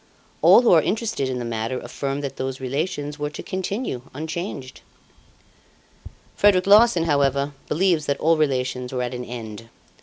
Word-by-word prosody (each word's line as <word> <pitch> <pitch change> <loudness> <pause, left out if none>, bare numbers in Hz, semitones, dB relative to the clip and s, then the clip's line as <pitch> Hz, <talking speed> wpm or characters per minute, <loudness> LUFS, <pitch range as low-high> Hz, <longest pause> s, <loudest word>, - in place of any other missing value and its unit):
All 245 - +7
who 235 - +4
are 165 - +6
interested 215 - -2
in 130 - -3
the 120 - -4
matter 115 +2 -3
affirm 140 +1 -4
that 140 -2 -5
those 130 0 -4
relations 145 +2 -3
were 150 0 -2
to 150 - -8
continue 190 - -3
unchanged. 155 -3 -6 1.5
"Frederic 195 -3 +4
Larsan, 205 -3 +6
however, 140 -2 +1 0.2
believes 170 -1 +1
that 140 - -1
all 165 +1 +3
relations 130 -4 -1
were 125 -1 -2
at 125 0 -4
an 125 0 -5
end. 115 -2 -8
145 Hz, 155 wpm, -23 LUFS, 130-170 Hz, 1.5 s, All